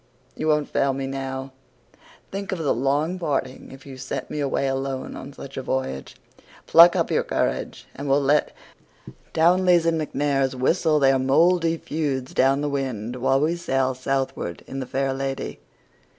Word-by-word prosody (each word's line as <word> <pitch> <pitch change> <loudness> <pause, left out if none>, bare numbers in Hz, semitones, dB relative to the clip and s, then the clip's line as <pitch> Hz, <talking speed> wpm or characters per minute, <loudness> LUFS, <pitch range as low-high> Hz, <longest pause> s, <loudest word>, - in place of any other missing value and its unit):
You 155 - -3
won't 150 -1 +2
fail 135 0 +1
me 135 0 -3
now. 135 0 -5 0.8
Think 195 0 -4
of 190 - -1
the 160 -4 +1
long 145 +8 0
parting 135 -5 -3
if 135 0 -13
you 135 -2 -9
send 135 +1 -5
me 150 - -3
away 140 -1 0
alone 135 0 -3
on - - -8
such - - -10
a - - -2
voyage. 65 0 -3 0.5
Pluck 170 +1 +8
up - - 0
your - - +3
courage, - - -2
and 140 0 -5
we'll 140 +1 +4
let 145 +2 +2 0.8
Townleys 175 +1 +4
and 165 -1 +1
MacNairs 135 -3 0
whistle 155 +4 +2
their 135 -2 +4
mouldy 165 +5 +3
feuds 145 -5 -3
down 135 +2 +3
the 150 - -1
wind 125 -4 -3
while 135 +2 +2
we 160 +3 +1
sail 135 -6 0
southward 130 -9 -3
in 135 - -6
The 130 - -5
Fair 135 +1 -1
Lady. 135 0 -4
135 Hz, 165 wpm, -24 LUFS, 135-155 Hz, 0.8 s, Pluck